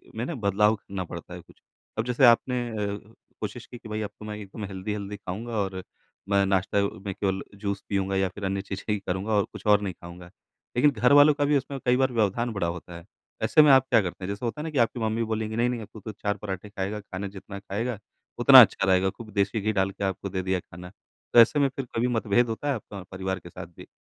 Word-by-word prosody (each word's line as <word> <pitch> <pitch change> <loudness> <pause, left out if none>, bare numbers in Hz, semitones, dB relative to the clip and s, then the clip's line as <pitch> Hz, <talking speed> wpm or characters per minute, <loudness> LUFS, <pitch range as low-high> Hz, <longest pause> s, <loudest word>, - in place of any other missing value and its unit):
में 115 +2 -2
ना 165 - -4
बदलाव 105 0 +2
करना 100 -2 -6
पड़ता 85 +1 -9
है 90 - -7
कुछ। 85 - -22 0.4
अब 110 - 0
जैसे 125 +2 +3
आपने 125 +1 +4
अ, 105 0 -5 0.3
कोशिश - - -5
की 120 - -11
कि 115 -2 -12
भाई 110 0 -3
अब 105 - -3
तो 105 - -9
मैं 105 0 -5
एकदम 105 +1 -8
हेल्दी-हेल्दी 100 +1 -5
खाऊँगा 105 +5 -6
और 95 -2 -2 0.5
मैं 100 -1 +3
नाश्ता 95 +1 +1
अ, 100 0 +1 0.2
में 100 - -2
केवल 95 0 -1 0.2
जूस 100 -1 -3
पियूँगा 95 -1 0
या 95 0 +2
फिर 100 +2 -11
अन्य 95 0 -1
चीज़ें 95 -1 -7
ही 105 - -1
करूँगा 95 +3 -3
और 100 - +4
कुछ - - -11
और 105 -1 +5
नहीं 95 -2 -3
खाऊँगा। 85 +1 -12 0.5
लेकिन 145 +4 +5
घरवालों 145 +5 +6
का 145 0 0
भी 145 0 +3
उसमें 135 +1 -5
कई 125 0 +4
बार 130 -1 +2
व्यवधान 115 +2 +1
बड़ा 100 -5 -1
होता 85 0 -6
है, 85 - -13 0.4
ऐसे 155 +8 +6
में 150 -2 +7
आप 130 -1 +6
क्या 115 -2 +5
करते 95 0 -6
हैं? 90 - -4
जैसे 100 +4 -4
होता 115 +6 -3
है - - -4
ना 160 - -3
कि 145 - -4
आपकी 120 0 +2
मम्मी 110 +1 0
बोलेंगी 110 0 -3
नहीं, 120 +2 +2
नहीं 120 -2 -3
अब 105 - -9
तू 110 - -9
तो 110 - -7
4 100 0 -3
पराठे 100 0 -6
खाएगा, 100 +1 -4
खाने 100 0 -6
जितना 100 0 -9
खाएगा 105 +3 -3 0.4
उतना, - - +10
अच्छा - - +3
रहेगा, 95 0 +3
खूब 110 +1 -11
देसी 100 +1 0
घी 110 +2 +1
डाल 95 0 +1
के 100 - -7
आपको 95 0 -2
दे 95 0 -2
दिया 95 0 0
खाना। 90 +1 -11 0.4
तो - - +8
ऐसे 120 +6 +6
में 140 -1 +3
फिर 135 - -4
कभी 120 +2 +1
मतभेद 115 0 +1
होता 115 +6 -4
है 145 - +2
आपका 100 -4 -8
परिवार 95 0 -3
के 85 0 -12
साथ - - -8
भी? - - -11
105 Hz, 250 wpm, -26 LUFS, 95-115 Hz, 0.5 s, उतना